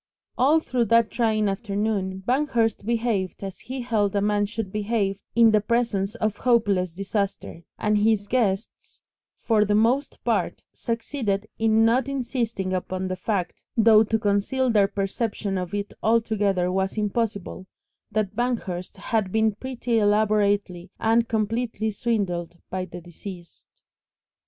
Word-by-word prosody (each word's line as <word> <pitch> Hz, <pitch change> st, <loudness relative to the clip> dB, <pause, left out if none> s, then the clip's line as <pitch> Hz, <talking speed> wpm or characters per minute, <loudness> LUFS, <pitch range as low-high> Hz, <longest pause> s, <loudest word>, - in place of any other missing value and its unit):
All 290 Hz, +6 st, +4 dB
through 250 Hz, -6 st, 0 dB
that 230 Hz, +1 st, +3 dB
trying 220 Hz, -3 st, +1 dB
afternoon 195 Hz, -2 st, -2 dB
Banghurst 240 Hz, -6 st, +1 dB
behaved 225 Hz, -6 st, -1 dB
as 195 Hz, -1 st, -6 dB
he 260 Hz, +1 st, -6 dB
held 215 Hz, -5 st, 0 dB
a -, -, +3 dB
man 205 Hz, 0 st, +1 dB
should 215 Hz, -2 st, -5 dB
behave 205 Hz, -2 st, -1 dB, 0.2 s
in 230 Hz, -1 st, +6 dB
the 215 Hz, -1 st, +4 dB
presence 210 Hz, -3 st, 0 dB
of 215 Hz, -1 st, -1 dB
hopeless 205 Hz, -8 st, +2 dB
disaster, 195 Hz, -3 st, -3 dB, 0.2 s
and 210 Hz, 0 st, +1 dB
his 210 Hz, -1 st, +2 dB
guests 215 Hz, -3 st, -2 dB, 0.4 s
for 220 Hz, -3 st, +3 dB
the 205 Hz, 0 st, +1 dB
most 245 Hz, +7 st, +2 dB
part -, -, -1 dB
succeeded 230 Hz, -3 st, -2 dB
in 225 Hz, 0 st, +4 dB
not 245 Hz, +3 st, +2 dB
insisting 235 Hz, -7 st, -2 dB
upon 185 Hz, 0 st, -2 dB
the 185 Hz, -, -2 dB
fact 185 Hz, -1 st, -3 dB, 0.2 s
though 220 Hz, -1 st, +7 dB
to 220 Hz, +1 st, 0 dB
conceal 215 Hz, +5 st, +1 dB
their 205 Hz, -3 st, +4 dB
perception 200 Hz, 0 st, -2 dB
of 180 Hz, -1 st, -3 dB
it 205 Hz, 0 st, -3 dB
altogether 210 Hz, -5 st, +1 dB
was 190 Hz, +2 st, -1 dB
impossible 210 Hz, -3 st, -2 dB, 0.4 s
that 210 Hz, -1 st, -1 dB
Banghurst 220 Hz, -8 st, -2 dB
had 200 Hz, -1 st, -1 dB
been 220 Hz, 0 st, +2 dB
pretty 245 Hz, 0 st, -2 dB
elaborately 205 Hz, -3 st, +1 dB
and 225 Hz, +1 st, +3 dB
completely 220 Hz, 0 st, -1 dB
swindled 190 Hz, -6 st, -2 dB
by 185 Hz, 0 st, -2 dB
the 175 Hz, 0 st, -9 dB
deceased. 175 Hz, +1 st, -11 dB
210 Hz, 135 wpm, -24 LUFS, 195-230 Hz, 0.4 s, though